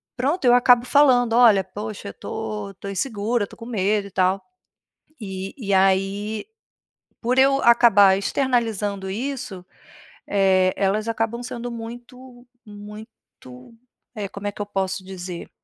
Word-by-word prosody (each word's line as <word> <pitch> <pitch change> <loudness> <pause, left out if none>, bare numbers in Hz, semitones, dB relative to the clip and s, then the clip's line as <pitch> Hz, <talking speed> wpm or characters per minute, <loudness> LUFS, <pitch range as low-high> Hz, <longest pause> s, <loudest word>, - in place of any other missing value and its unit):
pronto, 275 +5 -1
eu 245 - +6
acabo 245 -1 +5
falando: 250 -5 +4
"Olha, 225 -5 +6
poxa 205 +2 -7
eu - - -9
tô 210 -2 -5
eu - - -12
tô 200 - -8
insegura, 210 +2 -1
eu - - -4
tô - - -15
com 230 - -10
medo 210 -2 0
e - - -15
tal." 185 +1 +1 0.8
E 190 -2 -6
e 200 -7 -2
aí, 195 - +1 0.7
por 250 +2 -1
eu 275 +1 +4
acabar 205 -5 +6
externalizando 210 -4 -1
isso, 245 -4 -5 0.6
eh, 190 -2 +3
elas 205 +3 0
acabam 230 +1 -2
sendo 245 -1 -6
muito 245 +2 -10 0.2
muito, 210 - -13 0.4
eh, 210 -3 -4
como 200 +1 -7
é 205 - -2
que 205 - -6
eu - - -5
posso 190 -1 -3
dizer? 180 -2 -8
210 Hz, 145 wpm, -22 LUFS, 195-240 Hz, 0.8 s, eu